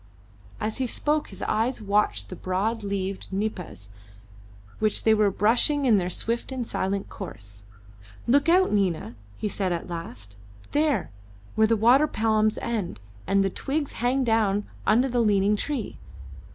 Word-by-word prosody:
As 215 +1 -2
he 260 -1 0
spoke 300 +5 0
his 195 - -8
eyes 230 +4 0
watched 200 - 0
the - - -6
broad 205 +5 -1
leaved 195 -1 -3
nipas 190 - -4 0.9
which 215 -1 +1
they 220 - +5
were 210 -1 +4
brushing 245 +9 +2
in 225 -5 +5
their 180 -2 0
swift 230 +8 -2
and 255 -2 -3
silent 195 -2 -2
course. 100 - -9 0.6
"Look 280 +6 +3
out, 370 +2 +4
Nina," 175 - 0 0.2
he - - -2
said 195 -2 -1
at 170 0 -3
last; 115 -12 -6 0.3
"there, 295 -1 +1 0.4
where 220 0 +4
the 225 0 +2
water 250 +8 +5
palms 215 -3 +1
end 215 - -2 0.3
and 195 0 +3
the 195 - 0
twigs 285 +6 -2
hang 250 +3 0
down 215 -3 +2 0.2
under 245 +5 +4
the 245 -2 +1
leaning 205 -1 +3
tree. 255 0 -3
215 Hz, 150 wpm, -26 LUFS, 195-240 Hz, 0.9 s, they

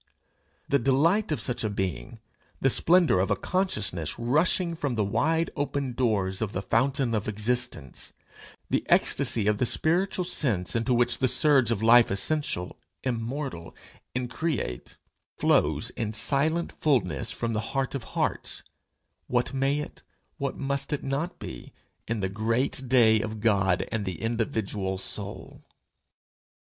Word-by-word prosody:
The 140 - +2
delight 155 - +2
of 155 - 0
such 125 -2 -2
a 110 - 0
being, 100 +3 -4 0.4
the 135 - +3
splendour 170 - +4
of 95 - +1
a - - +3
consciousness 105 - -1
rushing 155 +8 +2
from 145 -6 -2
the 110 - +1
wide 160 +11 +1
open 140 -2 -2
doors 105 -6 0
of 105 -2 -2
the 95 - -3
fountain 135 +1 +1
of 105 -1 -1
existence, 110 - -2 0.6
the - - 0
ecstasy 120 -6 +2
of 105 -1 +1
the - - +2
spiritual 180 +6 +1
sense 115 - 0
into 115 +3 0
which 120 0 +2
the 130 - +3
surge 130 -1 +4
of 110 -2 -1
life 120 +1 +7
essential, 95 - -1 0.3
immortal, 120 - -4 0.4
increate, 125 - -3 0.4
flows - - +2
in 110 -2 -4
silent 150 +9 +1
fulness 100 - 0
from 115 -1 -2
the 110 - 0 0.2
heart 135 -1 0
of 135 -4 -4
hearts - - -1 0.6
what 125 +2 0
may 135 +2 +1
it, 150 - -9 0.4
what 140 -2 -3
must 140 0 -2
it 150 - -2
not 140 +6 -2
be, - - -9 0.3
in 115 -2 -2
the 95 - 0
great 115 +6 -1
day 110 -4 +5
of 110 -1 -5
God 95 -5 +2
and 110 -3 -2
the 90 -4 -4
individual 110 -4 -2
soul! 100 +1 -3
120 Hz, 145 wpm, -27 LUFS, 105-140 Hz, 0.6 s, life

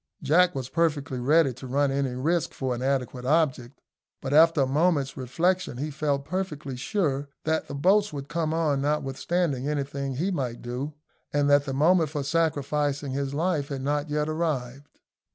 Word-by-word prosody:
Jack 180 +3 +4
was 130 -2 -3
perfectly 145 -4 0
ready 140 +2 +3
to 130 +2 -10
run 140 +2 +1
any 135 -2 -1
risk 165 +6 0
for 130 -2 -2
an 120 - -5
adequate 130 -2 -1
object; 135 -3 0 0.4
but 135 - -4
after 165 0 +6
a - - +4
moment's 145 0 +1
reflection 165 +5 0
he 150 +4 -3
felt 140 -1 -1
perfectly 155 -6 -4
sure 140 0 -1 0.2
that 160 0 0
the 140 - -6
boats 195 +8 +3
would 140 -2 -6
come 165 -1 -1
on 155 -4 +1
notwithstanding 145 0 -1
anything 140 -2 -3
he 175 +9 -1
might 125 -8 -3
do, 130 +5 -4 0.4
and 145 0 +2
that 145 0 +5
the 135 - -3
moment 160 +2 +4
for 145 -2 -3
sacrificing 145 -2 0
his 140 +1 -2
life 155 -3 0
had 135 -2 -5
not 145 +2 -1
yet 150 0 0
arrived. 145 -4 -3
145 Hz, 170 wpm, -26 LUFS, 135-160 Hz, 0.4 s, after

